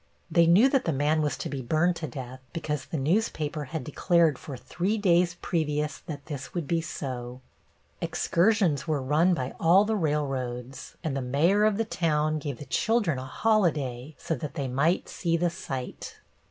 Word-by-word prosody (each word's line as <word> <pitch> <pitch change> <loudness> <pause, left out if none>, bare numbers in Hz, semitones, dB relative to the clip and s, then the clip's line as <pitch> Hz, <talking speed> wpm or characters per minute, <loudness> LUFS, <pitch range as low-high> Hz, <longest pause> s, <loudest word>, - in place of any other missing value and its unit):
They 170 -1 +5
knew 190 +10 +7
that 270 -1 +1
the 165 - +1
man 150 +2 +1
was 150 -1 -1
to - - -4
be 140 -2 -4
burned 160 +8 +2
to 160 - -4
death 130 -1 -7
because 150 -4 -3
the 160 - -4
newspaper 155 -1 0
had 155 +1 -5
declared 165 +1 +2
for 140 -4 -7
three 180 - -2
days 175 -3 +3
previous 150 -3 -1
that 145 -4 -8
this 140 -2 -7
would 170 -5 -2
be 165 +1 +1
so. 125 -5 -5 0.6
Excursions 175 - +1
were 155 -2 +1
run 155 +7 +3
by 130 -4 -3
all 180 +5 +5
the 220 +1 0
railroads, 135 - -3
and 155 -4 -2
the 135 - -1
mayor 165 +12 +3
of 215 -2 +2
the 225 - 0
town 155 -5 0
gave 140 -4 -5
the 145 - -9
children 210 - +1
a 130 - -6
holiday 150 - 0
so - - -3
that 150 0 -5
they 140 -2 -2
might 140 +8 +1
see 170 -2 -1
the 175 0 +1
sight. 135 -8 -6
155 Hz, 180 wpm, -27 LUFS, 135-175 Hz, 0.6 s, knew